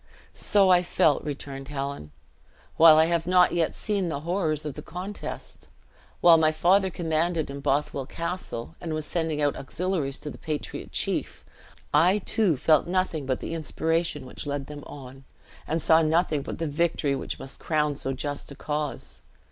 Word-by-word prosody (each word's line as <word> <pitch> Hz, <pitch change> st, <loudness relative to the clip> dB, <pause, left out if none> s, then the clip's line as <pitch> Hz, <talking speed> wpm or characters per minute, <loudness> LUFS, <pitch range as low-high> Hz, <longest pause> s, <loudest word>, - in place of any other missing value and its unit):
"So 195 Hz, -2 st, +3 dB
I 180 Hz, -1 st, +6 dB
felt," 160 Hz, -4 st, +2 dB
returned 140 Hz, -2 st, -6 dB
Helen, 140 Hz, -, -5 dB, 0.7 s
"while 160 Hz, -1 st, +8 dB
I 160 Hz, -, +6 dB
have 170 Hz, 0 st, 0 dB
not 180 Hz, 0 st, +5 dB
yet 170 Hz, -2 st, 0 dB
seen 200 Hz, -4 st, -1 dB
the 145 Hz, -3 st, -3 dB
horrors 160 Hz, -3 st, -1 dB
of 150 Hz, -, -3 dB
the -, -, -8 dB
contest. 185 Hz, +5 st, -7 dB, 0.5 s
While 170 Hz, -2 st, +7 dB
my 155 Hz, -1 st, +4 dB
father 190 Hz, +5 st, +3 dB
commanded 165 Hz, -2 st, -1 dB
in 140 Hz, -, -6 dB
Bothwell 140 Hz, -1 st, -1 dB
Castle, 170 Hz, -5 st, -5 dB
and 160 Hz, -2 st, -3 dB
was 155 Hz, -1 st, -3 dB
sending 160 Hz, -3 st, -1 dB
out 145 Hz, -, +2 dB
auxiliaries 155 Hz, -2 st, -2 dB
to 150 Hz, -, -5 dB
the -, -, -11 dB
patriot 155 Hz, -2 st, -5 dB
chief, -, -, -2 dB, 0.5 s
I 175 Hz, +7 st, +5 dB
too 205 Hz, -, +1 dB
felt 155 Hz, +3 st, +3 dB
nothing 175 Hz, -6 st, -1 dB
but 130 Hz, -, -1 dB
the -, -, -4 dB
inspiration 160 Hz, -2 st, -1 dB
which 130 Hz, -, -8 dB
led 140 Hz, -1 st, -2 dB
them 145 Hz, 0 st, -9 dB
on, 135 Hz, -1 st, -11 dB, 0.4 s
and 160 Hz, +2 st, 0 dB
saw 160 Hz, 0 st, +5 dB
nothing 160 Hz, -1 st, +2 dB
but -, -, -6 dB
the 165 Hz, -, -2 dB
victory 150 Hz, -2 st, 0 dB
which -, -, -4 dB
must 135 Hz, -, -9 dB
crown 150 Hz, -2 st, 0 dB
so 135 Hz, -1 st, -3 dB
just 145 Hz, +2 st, -4 dB
a -, -, -8 dB
cause. 150 Hz, 0 st, -4 dB
155 Hz, 170 wpm, -26 LUFS, 145-170 Hz, 0.7 s, while